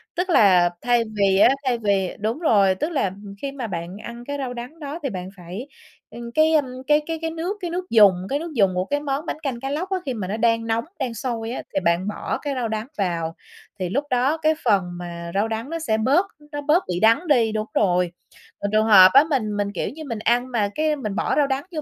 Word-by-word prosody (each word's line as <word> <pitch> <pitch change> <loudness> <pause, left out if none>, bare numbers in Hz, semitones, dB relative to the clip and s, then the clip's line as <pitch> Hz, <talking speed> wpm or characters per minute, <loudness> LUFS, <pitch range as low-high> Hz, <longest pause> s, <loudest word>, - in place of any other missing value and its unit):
Tức 360 +2 -1
là 185 - +5
thay 240 -1 +2
vì 195 -2 +3
á - - +7 0.2
thay 250 -2 +1
vì 200 -4 0
đúng 220 +7 -2
rồi, 200 - +3
tức 300 - -2
là 275 - 0 0.3
khi 280 - -3
mà 265 -4 -5
bạn 175 0 -5
ăn 235 0 -8
cái 285 0 -3
rau 260 -3 -4
đắng 245 +7 -8
đó 295 +2 -6
thì 275 - -1
bạn 185 -2 -6
phải, 180 +9 -8 0.4
ừm, 235 0 -8
cái, 310 +5 +3
ơ, 310 - +5 0.3
cái 300 0 +4
cái 325 -1 -3
cái 325 - -1
nước 340 +5 -3
cái 350 - -3
nước 360 +1 -4
dùng 210 -4 +7 0.2
cái 280 - 0
nước 335 +1 -6
dùng 195 -5 +3
của 185 +1 0
cái 290 +5 -1
món 285 +1 -3
bánh 310 - -4
canh 260 -5 -3
cá 270 - -4
lóc 320 +7 -3
á, 380 - 0
khi 265 - -2
mà 210 -6 -4
nó 210 +4 -3
đang 230 0 +1
nóng 230 +2 0
đang 255 -3 -2
sôi 230 -1 -4
á, 255 - -4
thì - - +1
bạn 170 +3 +2
bỏ 210 - -3
cái 290 -2 -2
rau 245 -3 -1
đắng 220 +2 -3
vào, 170 -4 -2 0.4
thì 185 -2 -2
lúc 275 +10 0
đó 260 +5 +2
cái 315 0 +2
phần 205 -6 +3
mà 170 -1 -7
rau 205 +3 +1
đắng 225 +4 -4
nó 330 +1 -3
sẽ 220 -9 0
bớt 280 - +3 0.3
nó 290 -1 -4
bớt 310 +6 +3
bị 180 0 -2
đắng 230 +10 +3
đi 240 -7 +3
đúng 215 0 -2
rồi. 180 -3 +2 0.5
Còn 205 - -3
trường 215 +1 +3
hợp 190 -4 +9
á 275 - +8
mình 215 -8 -1
mình, 200 0 -1
kiểu - - -2
như, 315 +3 -9
mình 230 -7 -5
ăn 240 +3 +1
mà 215 -4 +1
cái 310 0 +1
mình 215 -8 -4
bỏ - - 0
rau 290 -2 +3
đắng 270 +1 -1
vô 315 -3 -4
235 Hz, 255 wpm, -23 LUFS, 200-290 Hz, 0.5 s, hợp